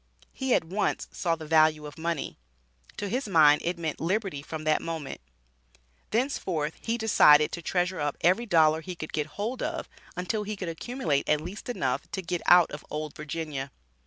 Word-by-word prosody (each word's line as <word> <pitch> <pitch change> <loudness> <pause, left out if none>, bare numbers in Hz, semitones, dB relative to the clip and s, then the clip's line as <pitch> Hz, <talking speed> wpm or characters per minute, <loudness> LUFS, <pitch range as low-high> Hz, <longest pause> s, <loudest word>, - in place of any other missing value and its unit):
He 265 -2 +1
at - - +2
once 190 +6 -1
saw 170 -2 0
the 160 -1 -9
value 155 -1 +4
of 145 - -9
money. 165 - -3 0.6
To 205 - -3
his 250 +4 -2
mind 155 -6 +6
it 175 +1 -1
meant 160 -3 -3
liberty 185 -3 -1
from 155 +1 -6
that 155 0 +2
moment. 160 - -5 0.9
Thenceforth 185 - -1
he 230 +1 -1
decided 150 -9 +6
to 170 - -5
treasure 180 +2 -1
up 145 -1 -1
every 190 +8 +3
dollar 160 -4 +4
he 180 +2 -7
could 155 -2 -7
get 150 -1 -1
hold 225 +5 -3
of - - -3 0.3
until 180 +4 -1
he 210 +1 -4
could 185 -4 -5
accumulate 165 - -2
at 150 - +4
least 185 - -8
enough 245 - -2
to 190 - -3
get 175 0 -2
out 175 -1 +7
of 150 - -7
"Old 150 -1 -5
Virginia." 150 -3 -4
165 Hz, 185 wpm, -27 LUFS, 155-195 Hz, 0.9 s, out